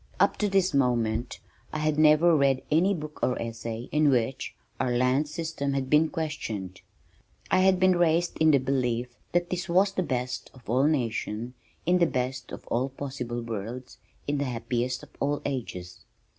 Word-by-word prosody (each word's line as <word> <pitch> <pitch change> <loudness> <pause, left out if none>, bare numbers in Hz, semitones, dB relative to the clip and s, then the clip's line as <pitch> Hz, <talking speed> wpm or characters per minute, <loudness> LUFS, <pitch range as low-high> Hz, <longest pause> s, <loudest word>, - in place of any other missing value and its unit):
Up - - +4
to 210 - +1
this 190 -3 +2
moment 120 -4 +1 0.3
I - - -3
had 155 0 0
never 155 +2 +6
read 135 -2 +2
any 185 +6 +3
book 150 -2 -7
or 125 - +1
essay 115 0 -5
in 150 -1 +4
which 130 0 0 0.2
our 125 - 0
land 130 +4 +2
system 150 -3 -3
had 135 -1 -2
been 155 +1 +5
questioned. 110 - -4 0.7
I 185 - +5
had 185 -1 +4
been 185 -1 +5
raised 175 0 +2
in 160 0 +5
the 145 - +6
belief 125 -2 0 0.2
that 175 0 +1
this 180 0 -3
was 190 +3 +4
the 190 - -1
best 125 -5 -3
of 125 -3 -17
all 130 +5 +3
nations 120 -4 -1 0.3
in 180 +1 +3
the 170 - +4
best 130 0 -3
of - - -8
all 130 +3 0
possible 130 -3 -5
worlds, 115 +3 -6 0.3
in 145 0 0
the 140 - 0
happiest 125 0 -2
of - - -12
all 145 +1 0
ages. 110 -10 -5
135 Hz, 175 wpm, -27 LUFS, 125-160 Hz, 0.7 s, never